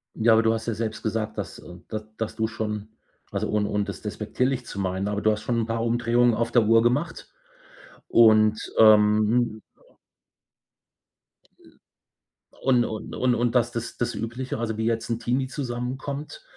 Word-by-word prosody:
Ja, 115 Hz, +1 st, +4 dB
aber 110 Hz, 0 st, +4 dB
du 115 Hz, 0 st, +3 dB
hast 110 Hz, 0 st, -4 dB
ja 115 Hz, -, -1 dB
selbst 110 Hz, 0 st, -4 dB
gesagt, 110 Hz, 0 st, -2 dB
dass, 105 Hz, -, -5 dB
äh 90 Hz, -, -12 dB, 0.2 s
d 110 Hz, -, -2 dB, 0.2 s
dass 110 Hz, -1 st, -4 dB
du 110 Hz, 0 st, 0 dB
schon 105 Hz, -2 st, -4 dB, 0.4 s
also, -, -, -2 dB
ohn 105 Hz, -1 st, +1 dB
ohne -, -, -3 dB
und 105 Hz, -1 st, -1 dB
das -, -, -7 dB
despektierlich 120 Hz, +5 st, -2 dB
zu 100 Hz, -, -7 dB
meinen, 95 Hz, +1 st, -2 dB
aber 105 Hz, 0 st, -2 dB
du 110 Hz, -, +3 dB
hast 105 Hz, 0 st, -2 dB
schon 120 Hz, -1 st, -1 dB
'n -, -, -1 dB
paar 115 Hz, 0 st, -2 dB
Umdrehungen 120 Hz, 0 st, +2 dB
auf 115 Hz, +1 st, -1 dB
der 120 Hz, -3 st, +4 dB
Uhr 115 Hz, 0 st, +5 dB
gemacht 145 Hz, +8 st, -1 dB, 0.8 s
und, 110 Hz, -2 st, +5 dB, 0.2 s
ähm 110 Hz, +1 st, +4 dB, 2.0 s
Ä -, -, -22 dB, 0.8 s
Und 125 Hz, -3 st, +3 dB
und 110 Hz, -1 st, -6 dB
und 125 Hz, -1 st, +2 dB
und 120 Hz, +1 st, 0 dB
das 120 Hz, -1 st, +2 dB
das 120 Hz, -1 st, -5 dB
das 120 Hz, 0 st, -1 dB
Übliche, 115 Hz, +1 st, -4 dB
also, 110 Hz, -2 st, -3 dB
wie 110 Hz, -, -1 dB
jetzt 115 Hz, 0 st, -1 dB
'n 115 Hz, 0 st, -1 dB
Teenie 125 Hz, +3 st, -1 dB
zusammen 125 Hz, -2 st, -4 dB
kommt, 145 Hz, -, -7 dB
115 Hz, 180 wpm, -25 LUFS, 110-120 Hz, 2.0 s, Uhr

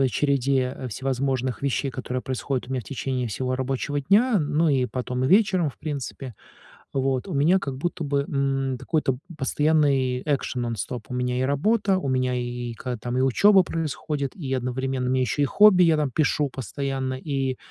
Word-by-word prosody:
той 135 Hz, -, +4 dB
череде 135 Hz, -2 st, 0 dB
всевозможных 130 Hz, +1 st, -2 dB
вещей, 140 Hz, 0 st, -1 dB
которые 125 Hz, 0 st, -4 dB
происходят 130 Hz, 0 st, -3 dB
у -, -, -10 dB
меня 130 Hz, -1 st, -1 dB
в -, -, -14 dB
течение 130 Hz, -1 st, -3 dB
всего 130 Hz, +4 st, -2 dB
рабочего 135 Hz, +2 st, -2 dB
дня, 210 Hz, -, +3 dB
ну, 150 Hz, +2 st, +1 dB
и, 130 Hz, -3 st, +2 dB
потом, 125 Hz, 0 st, -3 dB
и -, -, +3 dB
вечером, 190 Hz, -2 st, +4 dB
в 140 Hz, -, -10 dB
принципе, 140 Hz, -4 st, -5 dB, 0.6 s
вот, 135 Hz, +1 st, 0 dB
у 185 Hz, -, -5 dB
меня, 155 Hz, +7 st, +4 dB
как 140 Hz, -7 st, -4 dB
будто 170 Hz, +2 st, -3 dB
бы, 140 Hz, 0 st, +1 dB
м, 135 Hz, -2 st, -1 dB
какой-то 135 Hz, -4 st, 0 dB, 0.2 s
постоянный 140 Hz, -3 st, +2 dB
экшен, 135 Hz, -4 st, -1 dB
нон-стоп. 115 Hz, -1 st, -4 dB
У -, -, -5 dB
меня 125 Hz, 0 st, -1 dB
и -, -, 0 dB
работа, 190 Hz, -, +2 dB
у 185 Hz, -, -3 dB
меня, 130 Hz, -1 st, +1 dB
и, 120 Hz, -1 st, -3 dB
когда, 125 Hz, +1 st, -4 dB
там, 120 Hz, +3 st, -3 dB
и -, -, +2 dB
учёба 190 Hz, -, +5 dB
происходит, 150 Hz, -4 st, -3 dB
и, 135 Hz, -7 st, -3 dB
одновременно, 130 Hz, 0 st, -2 dB
у -, -, +1 dB
меня 130 Hz, 0 st, +2 dB
ещё 130 Hz, +3 st, 0 dB
и -, -, +4 dB
хобби: 190 Hz, +4 st, +6 dB
я, 165 Hz, -2 st, +4 dB
там, 150 Hz, -3 st, 0 dB
пишу 150 Hz, 0 st, +1 dB
постоянно. 135 Hz, +1 st, -3 dB
И, 135 Hz, -1 st, -2 dB
135 Hz, 185 wpm, -24 LUFS, 130-150 Hz, 0.6 s, хобби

